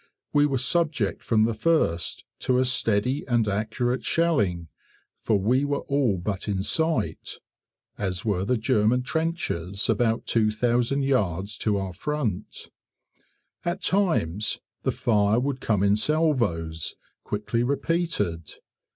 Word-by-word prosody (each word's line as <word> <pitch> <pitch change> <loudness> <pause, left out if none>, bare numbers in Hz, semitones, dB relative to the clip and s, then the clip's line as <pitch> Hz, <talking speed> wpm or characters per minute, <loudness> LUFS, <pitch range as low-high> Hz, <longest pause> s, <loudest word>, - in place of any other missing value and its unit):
We 145 0 +5
were 135 -2 0
subject 145 - 0
from 110 -2 +2
the 115 - 0
first 110 - 0
to 125 - +1
a 130 - +3
steady 125 +1 +1
and 120 -4 +2
accurate 110 +5 -1
shelling, 115 - +1 0.5
for 110 - +1
we 120 +8 +2
were 145 0 -1
all 135 -8 +1
but 95 +3 -4
in 95 -2 -1
sight, 160 -4 -1 0.6
as 95 -1 -2
were 100 -4 0
the 125 +5 +1
German 115 +1 +2
trenches 125 - -2
about 115 -1 +1
2000 120 +4 +1
yards 100 -7 0
to 105 -2 +1
our 95 -2 -3
front. 110 - -4 0.9
At 175 +2 -3
times 110 - +1 0.2
the - - 0
fire 105 -1 +2
would 130 0 -2
come 105 -3 +1
in 100 0 +4
salvos 105 - 0 0.3
quickly 105 +3 -2
repeated. 125 - -1
115 Hz, 125 wpm, -25 LUFS, 100-140 Hz, 0.9 s, We